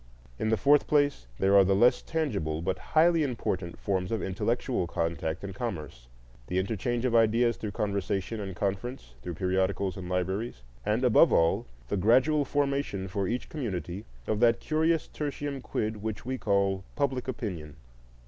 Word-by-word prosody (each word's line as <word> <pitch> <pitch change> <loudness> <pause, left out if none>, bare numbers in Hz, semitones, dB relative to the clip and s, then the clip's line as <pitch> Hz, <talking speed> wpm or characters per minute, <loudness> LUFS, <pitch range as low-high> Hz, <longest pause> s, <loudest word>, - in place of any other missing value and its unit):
In 110 - 0
the 110 - +3
fourth 145 +4 +4
place 145 - +2
there 95 +1 +3
are 100 - +8
the 95 +1 +2
less 120 +5 +4
tangible 100 - -2
but 95 - -1 0.2
highly 165 +1 +6
important 100 - -2
forms 95 -1 -1
of 110 -3 -1
intellectual 110 +1 -1
contact 85 0 -2
and 100 -1 -5
commerce, 80 - -5 0.4
the 90 - -2
interchange 115 +5 -1
of 125 - +1
ideas 115 +1 +4
through 105 +1 -5
conversation 100 +1 -1
and 95 -3 -5
conference, 100 - -3
through 85 +4 -5
periodicals 95 +2 0
and 90 -2 -6
libraries; 90 - -2 0.2
and, 105 +4 0
above 125 +7 +6
all, 80 -5 +3 0.2
the - - 0
gradual 130 - +4
formation 140 -9 -1
for 95 0 -2
each 125 +2 -2
community 100 - -4 0.2
of 110 - -1
that 115 -1 +4
curious 160 +1 +1
tertium 145 -2 -4
quid 110 -3 -2
which 110 +1 -5
we 130 +1 -2
call 100 -2 +1
public 135 -3 -1
opinion. 90 - -5
105 Hz, 160 wpm, -28 LUFS, 95-125 Hz, 0.4 s, are